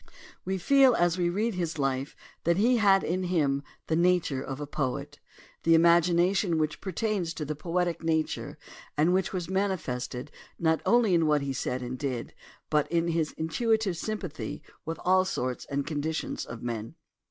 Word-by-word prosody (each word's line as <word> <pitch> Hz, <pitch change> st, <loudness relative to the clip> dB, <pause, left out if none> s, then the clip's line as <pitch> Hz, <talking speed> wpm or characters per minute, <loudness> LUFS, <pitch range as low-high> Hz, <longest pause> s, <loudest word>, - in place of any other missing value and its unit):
We 190 Hz, +1 st, -1 dB
feel 265 Hz, +5 st, +5 dB
as 175 Hz, +1 st, +2 dB
we 175 Hz, -1 st, +2 dB
read 215 Hz, +6 st, 0 dB
his 170 Hz, -3 st, -2 dB
life 135 Hz, 0 st, -1 dB, 0.3 s
that 170 Hz, +1 st, +2 dB
he 240 Hz, +5 st, +4 dB
had 195 Hz, -3 st, +4 dB
in 185 Hz, +2 st, -1 dB
him 145 Hz, -6 st, +1 dB, 0.2 s
the 160 Hz, -, 0 dB
nature 170 Hz, -5 st, +2 dB
of 135 Hz, 0 st, -5 dB
a 145 Hz, -, -3 dB
poet, 145 Hz, 0 st, -3 dB, 0.4 s
the 165 Hz, 0 st, +5 dB
imagination 170 Hz, +2 st, +4 dB
which 155 Hz, -1 st, -1 dB
pertains 190 Hz, -3 st, -2 dB
to 150 Hz, -, -4 dB
the 150 Hz, -, -2 dB
poetic 175 Hz, +3 st, -1 dB
nature 160 Hz, -1 st, -1 dB, 0.4 s
and 160 Hz, +4 st, +4 dB
which 185 Hz, -1 st, +1 dB
was 180 Hz, -3 st, -3 dB
manifested 155 Hz, -9 st, -2 dB, 0.3 s
not 160 Hz, -1 st, +1 dB
only 235 Hz, -5 st, +4 dB
in 165 Hz, -2 st, +3 dB
what 150 Hz, -1 st, +3 dB
he 140 Hz, -1 st, -2 dB
said 125 Hz, 0 st, -2 dB
and 125 Hz, +1 st, -5 dB
did 130 Hz, -5 st, -3 dB, 0.4 s
but 150 Hz, 0 st, +2 dB
in 170 Hz, 0 st, +1 dB
his 165 Hz, -2 st, 0 dB
intuitive 215 Hz, +4 st, 0 dB
sympathy 185 Hz, -3 st, -5 dB, 0.2 s
with 165 Hz, +1 st, -3 dB
all 185 Hz, +1 st, +5 dB
sorts 130 Hz, -9 st, -3 dB
and 140 Hz, -1 st, -2 dB
conditions 155 Hz, +1 st, -3 dB
of 115 Hz, 0 st, -8 dB
men. 115 Hz, -2 st, -4 dB
165 Hz, 170 wpm, -28 LUFS, 145-185 Hz, 0.4 s, feel